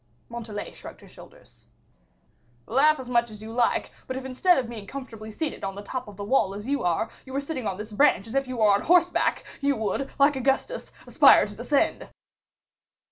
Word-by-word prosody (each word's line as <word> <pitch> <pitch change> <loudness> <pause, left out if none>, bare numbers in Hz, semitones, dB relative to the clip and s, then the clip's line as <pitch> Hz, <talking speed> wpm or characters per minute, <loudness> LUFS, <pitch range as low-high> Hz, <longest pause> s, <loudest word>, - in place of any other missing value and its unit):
Montalais 225 -3 -6
shrugged - - -12
her - - -15
shoulders. - - -17 1.0
"Laugh 290 +5 +3
as 260 - -7
much 235 -1 +1
as 215 -1 -11
you 220 +1 -8
like; 240 0 +1 0.2
but 260 - -4
if, 265 - -6
instead 265 +8 +3
of 255 -3 -1
being 220 -4 -8
comfortably 225 -5 -8
seated 295 +8 -4
on 195 0 -3
the 200 - -8
top 255 +3 -5
of 205 -2 -11
the 200 - -5
wall 200 -3 +1
as 205 +1 -7
you 280 +2 -1
are, 175 +5 0
you 265 - -12
were 275 - 0
sitting 280 -5 -4
on 190 - -3
this 210 +2 -7
branch 210 -3 +3
as 225 - -9
if 275 -1 0
you 255 -1 -5
were 215 -2 +5
on 200 +1 +3
horseback, 355 +1 +2 0.2
you 280 0 +1
would, 220 +5 -2
like 285 +1 +4
Augustus, 270 - -1
aspire - - +6
to - - -9
descend." - - 0
245 Hz, 205 wpm, -26 LUFS, 215-275 Hz, 1.0 s, aspire